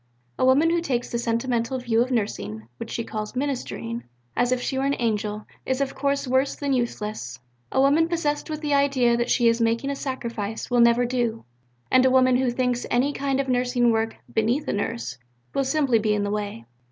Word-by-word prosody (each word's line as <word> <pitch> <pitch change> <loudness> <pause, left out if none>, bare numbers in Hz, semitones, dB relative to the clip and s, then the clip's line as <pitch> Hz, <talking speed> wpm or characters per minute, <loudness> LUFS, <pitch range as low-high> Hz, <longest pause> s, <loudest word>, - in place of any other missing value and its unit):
"A - - +2
woman 285 +6 +5
who 340 0 +2
takes 255 -7 -2
the 235 - -1
sentimental 235 +1 -1
view 235 -2 +1
of 250 - +1
Nursing 110 - -2
(which - - -7
she 230 - -3
calls 215 +1 -5
'ministering,' 250 -3 -3 0.3
as 245 0 +2
if 255 - +2
she 265 - -2
were - - 0
an 280 0 +1
angel) 210 -2 -1 0.2
is 260 0 -1
of 275 -1 -1
course 280 -1 -1
worse 260 +2 +2
than 280 -1 -1
useless; 210 - -3 0.3
a - - +1
woman 290 +4 +4
possessed 305 -4 -1
with 305 -1 -4
the 295 -2 0
idea 275 -4 +3
that 240 +1 -1
she 240 - +3
is 230 0 +3
making 230 +4 +1
a - - -2
sacrifice 235 -6 -4
will 245 -1 +4
never 235 +1 +5
do; 240 -2 -1 0.5
and 255 0 +6
a 260 - +5
woman 255 -1 +4
who 260 -1 +1
thinks 245 0 -1
any 265 +4 +2
kind 275 -1 -1
of 275 - 0
Nursing 245 -1 +2
work 225 0 0 0.2
'beneath 235 +7 +1
a - - 0
Nurse' 125 - -3 0.3
will 275 - +1
simply 270 -4 +2
be 215 -1 +1
in 205 - 0
the 205 - -1
way." 205 - -4
245 Hz, 210 wpm, -24 LUFS, 230-270 Hz, 0.5 s, and